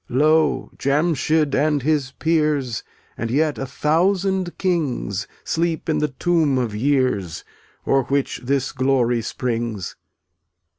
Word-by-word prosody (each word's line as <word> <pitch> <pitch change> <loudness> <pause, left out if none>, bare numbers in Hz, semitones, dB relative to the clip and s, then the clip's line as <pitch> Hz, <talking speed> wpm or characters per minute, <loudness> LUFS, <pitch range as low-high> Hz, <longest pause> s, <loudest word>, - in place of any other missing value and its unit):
Lo! 155 +4 +2
Jamschid 150 0 +1
and 145 -1 +1
his 145 -3 +1
peers, 150 -7 0 0.3
And 115 - -3
yet 150 +4 +1
a 135 - -3
thousand 185 +5 +1
kings, 140 - -1 0.2
Sleep 165 -1 -1
in 160 - +1
the 150 - +1
tomb 150 0 +1
of 120 -4 -1
years 125 - 0 0.4
O'er 135 - +3
which 140 0 -1
this 135 +1 0
glory 125 -3 +1
springs. 115 -5 -3
140 Hz, 115 wpm, -21 LUFS, 125-160 Hz, 0.4 s, O'er